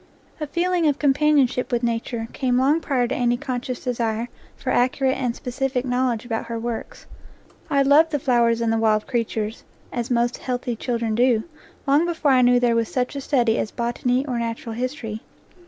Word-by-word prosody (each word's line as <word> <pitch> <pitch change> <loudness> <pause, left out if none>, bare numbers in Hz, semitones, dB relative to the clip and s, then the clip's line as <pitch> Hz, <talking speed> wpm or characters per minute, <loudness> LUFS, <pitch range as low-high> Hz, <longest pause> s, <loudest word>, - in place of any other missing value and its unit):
A 300 - -3
feeling 345 +1 +1
of 290 - +2
companion 290 0 +4
ship 250 +1 -4
with 240 0 0
Nature 230 0 -2
came 250 -3 0
long 280 +5 +3
prior 255 -6 0
to 260 - -2
any 240 -1 +1
conscious 255 0 -4
desire 235 -2 -1 0.3
for 255 - -3
accurate 260 +2 +2
and 250 -3 -2
specific 255 0 -2
knowledge 245 -2 0
about 225 -1 -3
her 230 0 -3
works. 230 0 -5 0.6
I 280 -1 +3
loved 295 +4 +5
the 300 - 0
flowers 235 -3 +2
and 225 -1 +1
the 225 - +1
wild 215 -1 +2
creatures, 225 -2 -2 0.3
as 240 +1 -3
most 240 0 +1
healthy 245 -1 -3
children 230 -1 -2
do, 235 -1 +3 0.4
long 290 +4 +3
before 320 -4 +1
I 255 -1 +5
knew 245 0 +5
there 240 -1 +2
was 230 -1 0
such 255 +1 -2
a 280 - -3
study 240 -5 +2
as - - -1
botany 245 +3 -1
or 250 -4 -2
natural 230 0 -4
history. 230 -3 -4
245 Hz, 190 wpm, -23 LUFS, 235-270 Hz, 0.6 s, loved